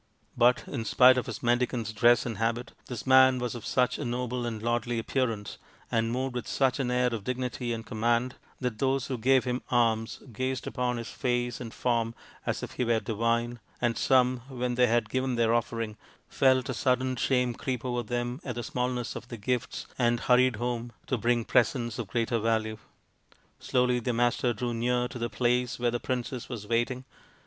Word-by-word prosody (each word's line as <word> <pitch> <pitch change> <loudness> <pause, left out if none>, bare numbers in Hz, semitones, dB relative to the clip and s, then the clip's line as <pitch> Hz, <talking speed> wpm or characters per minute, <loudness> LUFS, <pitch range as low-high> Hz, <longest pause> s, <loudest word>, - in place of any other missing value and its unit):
But 120 +1 +4
in 130 -5 -3
spite 125 +3 +6
of - - -5
his - - -6
mendicant's 120 -2 +1
dress 120 +3 +4
and 115 -5 -4
habit, 115 +2 -1 0.2
this 125 -3 -6
man 130 0 +6
was 125 -1 -2
of 120 -3 -7
such 125 -1 +1
a - - -2
noble 125 0 -2
and 115 -2 -4
lordly 120 +1 -1
appearance, 115 -3 -2 0.3
and 115 0 +1
moved 130 +1 -2
with 125 -2 -4
such 130 -1 +1
an 130 -3 0
air 125 -1 +2
of 110 -3 -4
dignity 125 0 -3
and 115 -1 -4
command, 120 +3 0 0.3
that 125 -4 -3
those 135 -1 +1
who 130 - -3
gave 130 +2 +4
him 125 0 -2
alms 115 -2 +1
gazed 130 +3 -2
upon 125 -1 -1
his 115 - -6
face 120 -1 -1
and 115 -2 -6
form 115 -1 0 0.3
as - - -1
if - - -5
he - - -2
were 115 -1 +2
divine, 115 +2 -1 0.2
and 120 -1 +1
some, 130 0 +3
when 125 -1 -2
they 125 0 +4
had 115 -1 +2
given 130 +2 -1
their 115 -1 +2
offering, 115 -2 -1 0.3
felt 130 -1 +3
a - - 0
sudden 130 0 +1
shame 125 0 +1
creep 125 0 -4
over 120 -1 -1
them 120 +4 -3
at 125 -4 -4
the 120 - -4
smallness 125 0 -2
of 125 - -7
their 120 - -7
gifts, 120 +3 -2
and 120 -1 +2
hurried 125 0 +4
home 120 +1 -3
to 130 - 0
bring 120 0 +1
presents 120 -1 +1
of 115 - -3
greater 115 +2 0
value. 110 -1 0 0.8
Slowly 125 -1 +1
the 120 +1 -1
Master 120 +1 +2
drew 120 +1 -2
near 125 +1 +1
to 125 - -7
the 120 0 -2
place 125 +2 0
where 120 0 +1
the 120 - -1
princess 125 0 -3
was 115 -5 -6
waiting. 120 +3 -1
120 Hz, 195 wpm, -28 LUFS, 115-125 Hz, 0.8 s, spite